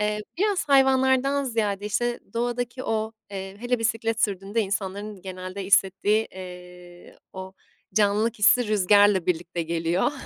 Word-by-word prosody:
Eee, 210 Hz, 0 st, 0 dB, 0.2 s
biraz 400 Hz, -5 st, 0 dB
hayvanlardan 265 Hz, 0 st, +3 dB
ziyade, 210 Hz, -5 st, -1 dB
işte, 240 Hz, +3 st, -1 dB
doğadaki 245 Hz, +2 st, -2 dB
o, 220 Hz, 0 st, -2 dB, 0.2 s
eee, 195 Hz, 0 st, -7 dB
hele 245 Hz, +1 st, 0 dB
bisiklet 225 Hz, 0 st, -1 dB
sürdüğünde 200 Hz, +2 st, -1 dB
insanların 200 Hz, 0 st, -4 dB
genelde 185 Hz, +1 st, -6 dB
hissettiği, 200 Hz, +3 st, +2 dB
eee, 180 Hz, -1 st, -12 dB
o 190 Hz, 0 st, -8 dB, 0.4 s
canlılık 215 Hz, +2 st, +2 dB
hissi 220 Hz, +2 st, +4 dB
rüzgarla 205 Hz, -2 st, +4 dB
birlikte 175 Hz, 0 st, -2 dB
geliyor. 170 Hz, -, 0 dB
210 Hz, 125 wpm, -25 LUFS, 190-235 Hz, 0.4 s, hissi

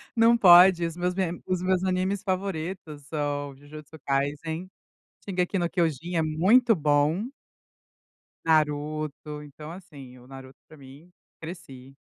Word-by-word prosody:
Não 230 Hz, 0 st, +5 dB
pode, 180 Hz, -4 st, +7 dB
os 165 Hz, 0 st, -8 dB
meus 180 Hz, +1 st, -1 dB
me 180 Hz, -2 st, -2 dB
os 185 Hz, -1 st, -2 dB
meus 185 Hz, 0 st, +1 dB
animes 190 Hz, +2 st, -1 dB
favoritos 185 Hz, -5 st, -4 dB
são, 145 Hz, -1 st, -4 dB
Jujutsu 150 Hz, +2 st, -13 dB
kaisen, 145 Hz, +5 st, -2 dB, 0.6 s
Shingeki 185 Hz, 0 st, -1 dB
no 175 Hz, -1 st, 0 dB
kyojin 170 Hz, 0 st, -1 dB
é 165 Hz, -, +2 dB
muito 195 Hz, +11 st, +3 dB
bom. 150 Hz, +6 st, +1 dB, 1.2 s
Naruto, 150 Hz, -1 st, -1 dB
então 150 Hz, +1 st, -11 dB
assim, 150 Hz, -8 st, -12 dB
o 125 Hz, -, -17 dB
Naruto 130 Hz, 0 st, -12 dB
para 155 Hz, -, -16 dB
mim, 140 Hz, +5 st, -15 dB, 0.3 s
cresci. 135 Hz, -6 st, -10 dB
160 Hz, 130 wpm, -26 LUFS, 145-185 Hz, 1.2 s, pode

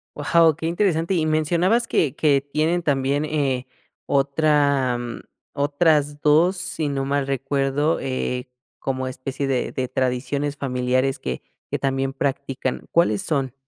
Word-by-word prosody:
Wao, 160 Hz, +1 st, +4 dB
qué 160 Hz, -, -6 dB
interesante. 170 Hz, -1 st, +1 dB
Y 165 Hz, -4 st, +1 dB
mencionabas 170 Hz, +9 st, +2 dB
que 145 Hz, -6 st, +1 dB
que 145 Hz, -3 st, +3 dB
tienen 155 Hz, +5 st, 0 dB
también, 140 Hz, -1 st, 0 dB
eh, 135 Hz, -5 st, -1 dB, 0.4 s
otra, 140 Hz, -2 st, +2 dB
mm, 120 Hz, -1 st, -6 dB, 0.3 s
otras 145 Hz, 0 st, +1 dB
2, 165 Hz, +5 st, +4 dB
si 175 Hz, -4 st, -2 dB
no 135 Hz, -1 st, -2 dB
mal 140 Hz, 0 st, 0 dB
recuerdo, 135 Hz, +3 st, 0 dB
eh, 130 Hz, -1 st, -3 dB, 0.3 s
como 130 Hz, -1 st, -2 dB
especie 130 Hz, +2 st, -4 dB
de 130 Hz, -2 st, -1 dB
de 130 Hz, -1 st, -2 dB
tradiciones 135 Hz, +3 st, -1 dB
familiares 130 Hz, 0 st, 0 dB
que 65 Hz, -1 st, -4 dB, 0.3 s
que -, -, -1 dB
también 135 Hz, 0 st, -1 dB
practican. 135 Hz, -1 st, -3 dB
¿Cuáles 110 Hz, -12 st, +3 dB
son? 135 Hz, -5 st, -1 dB
140 Hz, 135 wpm, -23 LUFS, 135-155 Hz, 0.4 s, Wao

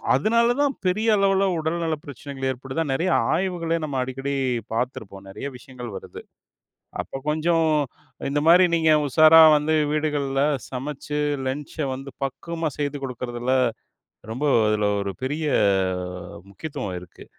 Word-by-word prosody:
அதனால 235 Hz, -, +3 dB
தான் 285 Hz, -1 st, +2 dB
பெரிய 215 Hz, +5 st, +1 dB
அளவில 195 Hz, 0 st, +3 dB
உடல் 160 Hz, +2 st, -1 dB
நல 160 Hz, -, 0 dB
பிரச்சனைகள் 140 Hz, -1 st, -5 dB
ஏற்படுது. 130 Hz, +4 st, -3 dB
நெறையா 170 Hz, +7 st, +1 dB, 0.2 s
ஆய்வுகளே 170 Hz, -2 st, -1 dB
நம்ம 145 Hz, -3 st, -3 dB
அடிக்கடி 135 Hz, +2 st, -3 dB, 0.4 s
பாத்திருப்போம். 110 Hz, -5 st, -4 dB
நெறைய 95 Hz, -, -7 dB
விஷயங்கள் 125 Hz, -4 st, -9 dB
வருது -, -, -9 dB, 0.8 s
அப்போ -, -, -7 dB
கொஞ்சம், 160 Hz, +1 st, +2 dB, 0.6 s
இந்த 145 Hz, +1 st, 0 dB
மாரி 180 Hz, +2 st, +7 dB
நீங்க 160 Hz, -1 st, +4 dB
உஷாரா 155 Hz, +4 st, +7 dB
வந்து 155 Hz, +2 st, +1 dB, 0.2 s
வீடுகள் 150 Hz, -2 st, 0 dB, 0.4 s
சமைச்சு 145 Hz, +3 st, -4 dB, 0.3 s
லன்ச்ச 145 Hz, +1 st, -4 dB
வந்து 135 Hz, +1 st, -8 dB
பக்குவமா 165 Hz, +4 st, -3 dB
செய்து 145 Hz, -1 st, -2 dB
கொடுக்குறதுல, 125 Hz, 0 st, -2 dB, 0.8 s
ரொம்ப 140 Hz, +5 st, -2 dB, 0.2 s
அதில 105 Hz, -1 st, +1 dB
ஒரு 100 Hz, -1 st, -3 dB
பெரிய 150 Hz, +4 st, -2 dB, 1.1 s
முக்கியத்துவம் 100 Hz, -, -5 dB
இருக்கு. 90 Hz, -, -14 dB
145 Hz, 125 wpm, -24 LUFS, 130-165 Hz, 1.1 s, மாரி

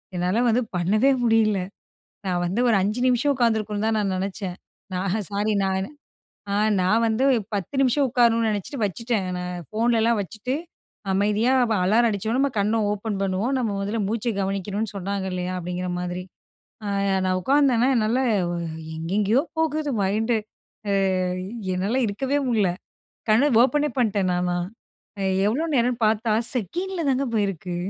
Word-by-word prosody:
என்னால 180 Hz, +6 st, +1 dB
வந்து 235 Hz, +2 st, +3 dB
பண்ணவே 210 Hz, +10 st, +3 dB
முடியல. 220 Hz, -3 st, +3 dB, 0.7 s
நான் 180 Hz, -1 st, 0 dB
வந்து 190 Hz, +7 st, -1 dB
ஒரு 225 Hz, -, +4 dB
5 210 Hz, +5 st, -1 dB
நிமிஷம் 255 Hz, +3 st, +2 dB
உட்காந்துருக்கணும்ன்னு 220 Hz, -3 st, 0 dB
தான் 225 Hz, -, +1 dB
நான் 200 Hz, -2 st, 0 dB
நெனைச்சேன். 190 Hz, -1 st, -4 dB, 0.4 s
நா 180 Hz, -, -1 dB, 0.3 s
சாரி 210 Hz, +2 st, 0 dB
நானு. 190 Hz, +4 st, -1 dB, 0.6 s
அ -, -, +1 dB, 0.3 s
நான் 215 Hz, +5 st, +3 dB
வந்து 225 Hz, +4 st, +1 dB, 0.3 s
10 200 Hz, -, -4 dB
நிமிஷம் 270 Hz, +2 st, +3 dB
உட்காரணும்னு 230 Hz, -2 st, +3 dB
நெனைச்சுட்டு 210 Hz, +6 st, -4 dB
வச்சுட்டேன். 215 Hz, 0 st, -1 dB
நான் 180 Hz, 0 st, -4 dB
ஃபோன்லலாம் 230 Hz, 0 st, +2 dB
வச்சுட்டு, 220 Hz, +6 st, -4 dB, 0.6 s
அமைதியா 210 Hz, +5 st, +2 dB, 0.2 s
ப -, -, +3 dB
"அலாரம் 230 Hz, +5 st, +4 dB
அடிச்சோன்ன, 220 Hz, +4 st, -1 dB
நம்ம 280 Hz, -, +2 dB
கண்ணை 210 Hz, +3 st, +1 dB
ஓப்பன் 210 Hz, -1 st, -3 dB
பண்ணுவோம், 195 Hz, +7 st, 0 dB
நம்ம 230 Hz, -4 st, 0 dB
முதல்ல 205 Hz, +3 st, -2 dB
மூச்சை 230 Hz, +1 st, -1 dB
கவனிக்கணும்ன்னு 200 Hz, +2 st, -2 dB
சொன்னாங்க 195 Hz, 0 st, -3 dB
இல்லையா?" 180 Hz, 0 st, -3 dB
அப்படீங்கிற 180 Hz, +1 st, -4 dB
மாதிரி. 180 Hz, 0 st, -4 dB, 0.6 s
அ -, -, -3 dB, 0.4 s
நான் 185 Hz, 0 st, +1 dB
உட்கார்ந்தேனா, 265 Hz, 0 st, +3 dB
என்னால 225 Hz, +2 st, +2 dB, 0.8 s
எங்கெங்கயோ 200 Hz, +9 st, +1 dB, 0.2 s
போகுது 310 Hz, -1 st, 0 dB
மைண்டு. 220 Hz, +5 st, +1 dB, 0.5 s
அ -, -, +1 dB, 0.8 s
என்னால 200 Hz, +7 st, 0 dB
இருக்கவே 270 Hz, +8 st, -1 dB
முடில. 220 Hz, -5 st, +2 dB, 0.6 s
கண்ண 265 Hz, +7 st, +4 dB
ஓப்பனே 295 Hz, +3 st, +1 dB
பண்ட்டேன், 200 Hz, -5 st, +1 dB
நானா. 180 Hz, 0 st, 0 dB, 0.9 s
எவ்வளோ 275 Hz, +10 st, 0 dB
நேரம்ன்னு 245 Hz, -1 st, +1 dB
பார்த்தா, 220 Hz, +1 st, +1 dB, 0.2 s
செகண்டில 345 Hz, -, -3 dB
தாங்க 265 Hz, +1 st, +1 dB
போயிருக்கு. 195 Hz, -4 st, -1 dB
215 Hz, 140 wpm, -24 LUFS, 195-240 Hz, 0.9 s, ஒரு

